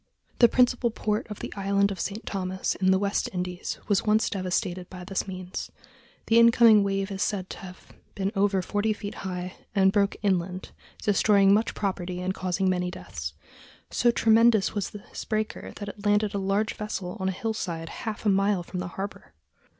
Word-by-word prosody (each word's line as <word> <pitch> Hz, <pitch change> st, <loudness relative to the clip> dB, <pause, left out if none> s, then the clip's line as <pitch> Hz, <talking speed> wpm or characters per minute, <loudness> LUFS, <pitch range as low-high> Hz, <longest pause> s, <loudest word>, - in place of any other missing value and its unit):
The 235 Hz, -, +8 dB
principal 245 Hz, 0 st, +3 dB
port 215 Hz, -1 st, -2 dB
of 210 Hz, -, -7 dB
the -, -, -5 dB
island 200 Hz, 0 st, +2 dB
of 190 Hz, -, -5 dB
St. 210 Hz, +3 st, -4 dB
Thomas, 190 Hz, -1 st, -2 dB
in 190 Hz, -1 st, +1 dB
the 190 Hz, -, +5 dB
West 200 Hz, +1 st, 0 dB
Indies, 180 Hz, -1 st, -4 dB
was 205 Hz, -2 st, +3 dB
once 215 Hz, +1 st, +2 dB
devastated 185 Hz, -2 st, -2 dB
by 180 Hz, -1 st, -9 dB
this 195 Hz, +2 st, -2 dB
means. 185 Hz, -1 st, -6 dB, 0.6 s
The 230 Hz, +1 st, +5 dB
incoming 230 Hz, -2 st, +7 dB
wave 195 Hz, 0 st, -1 dB
is 195 Hz, 0 st, -4 dB
said 190 Hz, -4 st, -1 dB
to -, -, -7 dB
have 185 Hz, -1 st, -11 dB, 0.2 s
been 195 Hz, 0 st, -1 dB
over 195 Hz, -1 st, +2 dB
forty 205 Hz, +3 st, 0 dB
feet 205 Hz, -1 st, -6 dB
high, 180 Hz, -1 st, -4 dB, 0.2 s
and 190 Hz, -1 st, +5 dB
broke 200 Hz, 0 st, +2 dB
inland, 185 Hz, -2 st, -1 dB, 0.3 s
destroying 200 Hz, -1 st, +4 dB
much 215 Hz, +2 st, +1 dB
property 185 Hz, -3 st, -2 dB
and 185 Hz, +1 st, -1 dB
causing 185 Hz, +1 st, -1 dB
many 180 Hz, -1 st, +1 dB
deaths. 75 Hz, -, -7 dB, 0.6 s
"So 240 Hz, -, +3 dB
tremendous 225 Hz, -2 st, +4 dB
was 205 Hz, -3 st, -2 dB
this 210 Hz, -, -9 dB
breaker 215 Hz, -1 st, -3 dB
that 205 Hz, -1 st, -6 dB
it 200 Hz, 0 st, -10 dB
landed 205 Hz, 0 st, +2 dB
a 200 Hz, -, -1 dB
large 200 Hz, +3 st, 0 dB
vessel 195 Hz, -4 st, -4 dB
on 190 Hz, 0 st, 0 dB
a -, -, +1 dB
hillside 180 Hz, -5 st, -3 dB
half 220 Hz, -1 st, -6 dB
a -, -, +4 dB
mile 195 Hz, -1 st, +2 dB
from 180 Hz, -, -6 dB
the 180 Hz, -, -3 dB
harbor." 195 Hz, -, -6 dB
195 Hz, 185 wpm, -27 LUFS, 185-210 Hz, 0.6 s, The